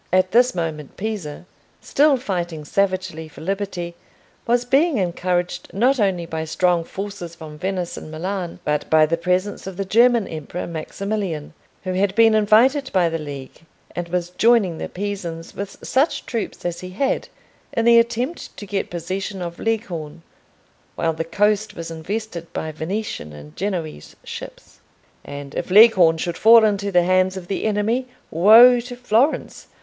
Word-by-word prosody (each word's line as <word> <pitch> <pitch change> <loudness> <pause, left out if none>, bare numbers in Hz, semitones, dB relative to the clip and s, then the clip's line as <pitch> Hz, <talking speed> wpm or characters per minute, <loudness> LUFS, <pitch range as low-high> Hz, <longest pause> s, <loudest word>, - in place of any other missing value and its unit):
At 185 +1 +3
this 245 0 +4
moment 155 -4 -4
Pisa, 195 -7 -5 0.3
still 290 -1 +3
fighting 175 - -4
savagely 185 -3 -1
for 155 - -14
liberty, 185 -1 -3 0.5
was 240 +1 +2
being 280 +4 +3
encouraged 180 -1 -2
not 255 +6 +3
only 190 -5 +1
by 160 -1 -4
strong 175 +1 +1
forces 195 -2 -7
from 155 -2 -10
Venice 185 -2 -3
and - - -8
Milan, 175 +3 -4
but 150 0 -1
by 155 -1 +5
the 165 +2 0
presence 180 +4 -1
of 190 -2 -7
the 195 - -2
German 235 +1 +4
Emperor 160 +2 -6
Maximilian, 170 0 -4 0.3
who 185 -1 -3
had 190 +1 0
been 225 -1 +6
invited 235 +7 +4
by 180 -3 +3
the 165 0 -3
League, 140 -2 -8 0.3
and 175 -1 -4
was 175 0 -2
joining 205 -5 +3
the - - -5
Pisans 180 -4 -5
with 200 0 -6
such 275 +5 +1
troops 230 -6 -4
as 175 -1 -2
he 185 - -8
had 265 +9 -1 0.4
in 230 - 0
the 235 0 +7
attempt 240 +7 -2
to 205 - -7
get 195 0 -3
possession 185 +3 -4
of 170 -1 -6
Leghorn, 175 -9 -3 0.7
while 165 -1 0
the 160 +1 -3
coast 210 +5 0
was 165 0 -6
invested 170 +1 -5
by 160 - -3
Venetian 160 - -4
and 75 0 -12
Genoese 175 - -4
ships. - - -10 0.4
And 140 -1 -8
if - - -4
Leghorn 185 -5 +7
should 170 +1 -3
fall 225 0 +7
into 200 -1 0
the 175 -2 +4
hands 185 +1 +2
of 180 -2 -8
the 195 - -3
enemy, 220 +4 0 0.2
woe 225 +8 +8
to 245 +1 -7
Florence! 245 +3 0
185 Hz, 160 wpm, -21 LUFS, 170-215 Hz, 0.7 s, woe